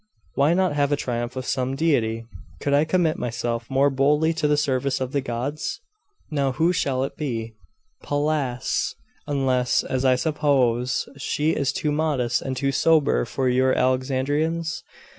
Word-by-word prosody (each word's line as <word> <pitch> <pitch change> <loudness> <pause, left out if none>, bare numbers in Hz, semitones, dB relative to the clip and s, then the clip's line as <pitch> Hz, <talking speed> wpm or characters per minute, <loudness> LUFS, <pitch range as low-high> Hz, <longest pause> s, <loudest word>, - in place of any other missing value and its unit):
Why 145 +5 +3
not 185 -3 +2
have 145 -1 +1
a - - +4
triumph 120 -2 -3
of 130 -1 -4
some 130 0 -1
deity? 115 -7 +1 0.3
Could 140 - -1
I 145 +2 +4
commit 165 -1 +1
myself 115 -1 -3
more 135 +1 +3
boldly 150 +4 +2
to 160 -2 0
the 150 0 +2
service 140 -2 0
of 130 -1 -3
the 140 - 0
gods! 130 +5 -3 0.5
Now 140 -3 0
who 165 +6 +2
shall 135 -6 0
it 135 - -4
be?' 115 -7 -4 0.5
'Pallas 145 -4 -1 0.3
unless, 130 -3 +1
as 130 0 -2
I 130 -1 +4
suppose, 130 -4 +1
she 150 +3 0
is 140 -3 0
too 150 - -1
modest 145 -6 0
and 130 -1 -4
too 140 +1 0
sober 145 - +3
for 130 - -2
your 130 +1 +2
Alexandrians? 145 +6 0
135 Hz, 160 wpm, -24 LUFS, 125-150 Hz, 0.5 s, a